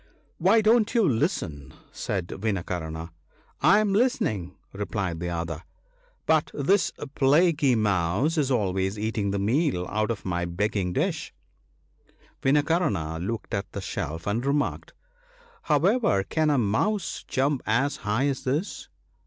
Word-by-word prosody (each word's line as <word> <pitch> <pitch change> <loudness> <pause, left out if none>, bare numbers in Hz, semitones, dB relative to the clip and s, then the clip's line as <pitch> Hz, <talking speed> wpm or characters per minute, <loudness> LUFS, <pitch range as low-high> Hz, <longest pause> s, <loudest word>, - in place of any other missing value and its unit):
"Why 195 +6 +5
don't 220 +1 +3
you 225 -5 +4
listen? 100 - -1
" - - -30
said 95 -4 -3
Vinakarna. 85 -5 -3 0.3
" - - -35
I 205 - +7
am 210 -2 +2
listening! 205 - 0
" - - -40
replied 95 -4 -3
the 90 +1 -3
other; 85 -2 -3 0.3
" - - -37
but 160 -1 +3
this 185 +9 +2 0.2
plaguy 145 -1 +4
mouse 105 - +1
is 145 -4 +1
always 95 -4 0
eat 110 +1 -2
ing 100 -1 0
the 100 - -1
meal 110 - +1
out 110 +1 0
of 115 -3 -4
my 90 -2 -1
begging 95 +1 -1
dish." - - -2 1.1
Vinakarna 135 - +1
looked 110 +6 -4
at 100 0 -3
the - - -4
shelf 80 -3 -4
and 110 +4 -1
remarked, 140 +1 -1 0.4
" 480 -2 -28
However 155 - +3
can 155 +9 0
a 145 - +3
mouse 150 - 0
jump 135 0 0
as 130 +6 +1
high 105 +6 0
as 140 -2 -1
this 145 +9 -2
115 Hz, 150 wpm, -26 LUFS, 95-160 Hz, 1.1 s, I